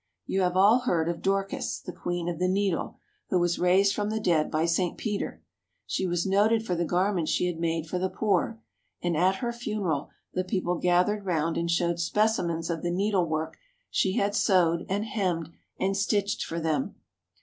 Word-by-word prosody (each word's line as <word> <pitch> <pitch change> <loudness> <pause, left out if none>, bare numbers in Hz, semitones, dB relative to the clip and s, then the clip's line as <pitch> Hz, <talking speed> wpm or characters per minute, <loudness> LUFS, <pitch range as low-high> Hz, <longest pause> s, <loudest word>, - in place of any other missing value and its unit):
You 190 - 0
have 180 0 +1
all 210 +6 +6
heard 175 -10 0
of 170 - -3
Dorcas, 195 0 -1
the 180 - -8
queen 175 -1 -3
of 170 -2 -3
the 180 - +2
needle, 195 -1 0 0.3
who 185 - +2
was 175 -1 +1
raised 190 +3 +4
from 205 0 -1
the 220 0 -1
dead 170 -7 +2
by 155 +1 +1
St. 170 +1 0
Peter. 210 -3 -3 0.4
She 190 - -1
was 175 -1 0
noted 215 +3 +3
for 180 - -1
the 175 0 0
garments 180 -1 +1
she - - +1
had 175 -2 -2
made 165 -1 -1
for 180 +3 -3
the 190 +1 0
poor, 215 +2 0 0.4
and 175 -2 0
at 185 +4 +3
her 235 +4 -3
funeral 200 -11 -2 0.2
the 185 - 0
people 180 -2 -1
gathered 180 +4 +2
round 165 -2 0
and 170 0 -1
showed 170 0 +1
specimens 170 -3 +1
of 165 -2 -3
the 175 - -1
needlework 175 -4 0 0.3
she 190 - +1
had 205 0 +1
sewed 170 -5 +2
and 205 +3 0
hemmed 180 -7 -1 0.3
and 195 +1 +1
stitched 200 0 0
for 165 - -4
them. 160 -2 -1
180 Hz, 190 wpm, -27 LUFS, 170-200 Hz, 0.4 s, all